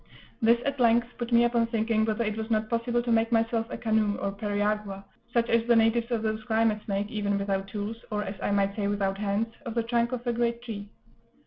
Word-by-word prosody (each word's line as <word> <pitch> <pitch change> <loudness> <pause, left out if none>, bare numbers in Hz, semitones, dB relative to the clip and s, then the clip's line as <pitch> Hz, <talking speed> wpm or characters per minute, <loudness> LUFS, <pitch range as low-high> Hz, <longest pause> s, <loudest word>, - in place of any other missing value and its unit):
This 235 +1 +5
at 280 -1 -1
length 235 0 +4
put 240 0 -4
me 235 0 +6
upon 235 -1 +2
thinking 225 -1 +1
whether 220 +1 0
it 215 -1 -2
was 220 0 -4
not 215 0 0
possible 240 +1 0
to 240 - -1
make 225 0 +2
myself 225 0 +1
a - - -5
canoe, 220 -3 +1
or 200 - -2
periagua, 205 -1 -2 0.3
such 235 -1 +2
as 230 0 +3
the 240 - +5
natives 225 +1 +3
of 230 -3 -1
those 215 0 -2
climates 220 -2 +1
make, 200 +1 -2
even 205 -2 0
without 195 -1 -1
tools, 210 +2 -4
or, 210 -1 -1
as 195 - -4
I - - -1
might 200 -1 +1
say, 205 -2 -1
without 200 -1 -1
hands, 210 +2 -1
of 235 -4 -6
the 235 - +1
trunk 235 +1 +1
of 250 -1 -4
a 240 - +1
great 235 0 -1
tree. 205 -4 -6
225 Hz, 230 wpm, -27 LUFS, 205-235 Hz, 0.3 s, me